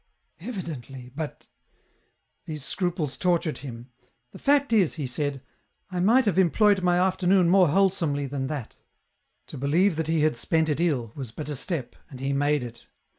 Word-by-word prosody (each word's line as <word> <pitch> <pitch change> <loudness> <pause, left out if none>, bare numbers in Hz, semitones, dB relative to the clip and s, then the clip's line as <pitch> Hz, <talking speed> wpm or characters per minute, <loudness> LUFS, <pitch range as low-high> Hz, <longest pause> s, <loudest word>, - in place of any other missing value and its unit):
235 175 - -5
''Evideiuly, 125 0 -11
but 155 -1 -6 1.0
these 150 -3 -5
scruples 170 -6 -2
tortured 170 -5 0
him; 120 -1 -9 0.2
" 125 +1 -48
the - - -10
fact 285 -2 +2
is," 195 -8 +3
he 150 -4 -3
said, 140 +1 -2 0.5
"I 180 - -2
might 230 +8 +4
have 195 -2 +2
employed 195 +3 +4
my 175 -1 +3
afternoon 185 -1 +3
more 185 -1 +6
wholesomely 165 -4 +1
than 135 -1 -3
that; 135 -5 -6 0.4
" - - -49
to - - -9
believe 160 +6 +2
that 160 -1 -1
he 160 -1 +1
had 155 -3 +2
spent 160 +5 +1
it 150 +2 0
ill 130 -10 0
was 130 -6 -7
but 150 +5 -7
a 150 - -2
step, 140 -1 -4
and 135 -4 -10
he 135 +1 -1
made 145 0 +1
it. 115 -1 -10
155 Hz, 180 wpm, -26 LUFS, 135-180 Hz, 1.0 s, more